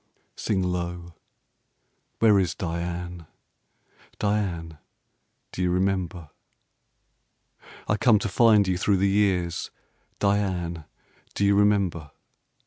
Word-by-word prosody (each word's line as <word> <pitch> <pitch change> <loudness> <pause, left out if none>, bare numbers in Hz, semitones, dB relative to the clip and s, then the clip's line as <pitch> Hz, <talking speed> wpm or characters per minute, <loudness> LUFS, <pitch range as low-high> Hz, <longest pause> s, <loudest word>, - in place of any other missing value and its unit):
Sing 95 -3 -1
low, 90 -1 -4 1.0
where 105 -3 +5
is 90 -4 -1
Diane? 85 -1 -5 0.9
Diane 90 -7 -2 0.7
do - - -5
you 90 - +1
remember? 90 -3 -1 1.6
I 105 - +1
come 110 0 +4
to 105 - -2
find 105 0 +4
you 90 -1 0
through 100 0 +2
the 95 +2 +2
years 95 -4 0 0.5
Diane! 95 -5 -1 0.5
do 100 - +1
you 100 - +4
remember? 100 -7 +1
90 Hz, 100 wpm, -25 LUFS, 85-100 Hz, 1.6 s, where